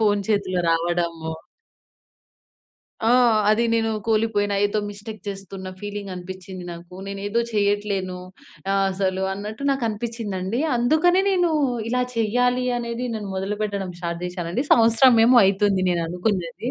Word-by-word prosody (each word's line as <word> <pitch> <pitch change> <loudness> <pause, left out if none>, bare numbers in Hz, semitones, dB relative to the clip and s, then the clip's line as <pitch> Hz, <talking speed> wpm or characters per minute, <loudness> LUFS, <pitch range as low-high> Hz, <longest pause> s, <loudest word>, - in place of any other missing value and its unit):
Phone 205 -2 +2
చేతిలో 185 -4 0
రావడము. 165 -1 -1 1.8
ఆ! - - +4 0.4
అది 225 +2 +3
నేను 225 -1 +1 0.2
కోలిపోయిన 215 -2 +1
ఏదో 205 +1 0
మిస్టేక్ 205 +1 -8
చేస్తున్న 195 -1 -7
ఫీలింగ్ 205 -1 -6
అనిపించ్చింది 185 0 -8
నాకు. 170 +1 -11
నేనేదో 200 +3 -2
చెయ్యట్లేను. 200 -3 0 0.5
ఆహ్, 195 0 +2
అసలు 190 0 -1
అన్నట్టు 210 +5 -6
నాకు 270 -3 0
అనిపించిందండి. 220 -1 -3 0.2
అందుకనే 315 +10 +3
నేను 355 -3 +2 0.4
ఇలా 250 +1 +1
చెయ్యాలి 245 +3 +1
అనేది 235 +1 -3
నేను 210 -2 -5
మొదలుపెట్టడం 200 -1 -3
స్టార్ట్ 170 -1 -4
జేశానండి. 180 - -3
సంవత్సరం 230 +2 +6
ఏమో 245 0 +7
అయితుంది 195 -1 +2
నేననుకున్నది 180 +5 -2
205 Hz, 120 wpm, -23 LUFS, 185-230 Hz, 1.8 s, ఏమో